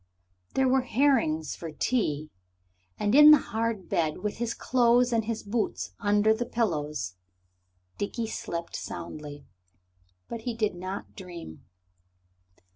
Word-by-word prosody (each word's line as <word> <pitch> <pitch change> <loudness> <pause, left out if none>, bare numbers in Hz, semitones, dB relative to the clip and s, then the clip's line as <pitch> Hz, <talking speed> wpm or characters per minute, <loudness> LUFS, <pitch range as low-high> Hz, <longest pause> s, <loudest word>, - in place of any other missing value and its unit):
There 265 0 +3
were 265 +1 +4
herrings 240 - +1
for 165 -2 -7
tea. 155 - -1 0.7
And 205 +1 0
in 295 +2 +10
the 305 - +10
hard 225 -6 -3
bed, 155 +1 -1
with 210 - -2
his 235 0 -2
clothes 245 0 +3
and 225 -1 +1
his 225 -1 -3
boots 215 +2 -2
under 210 0 +3
the 235 +2 -3
pillows, 150 - -2 0.8
Dickie 225 +3 -2
slept 170 -5 -5
soundly. 145 -2 -7 0.8
But 230 - -6
he 235 0 -3
did 215 -3 0
not 185 +3 -6
dream. 175 - -9
215 Hz, 125 wpm, -28 LUFS, 170-235 Hz, 0.8 s, in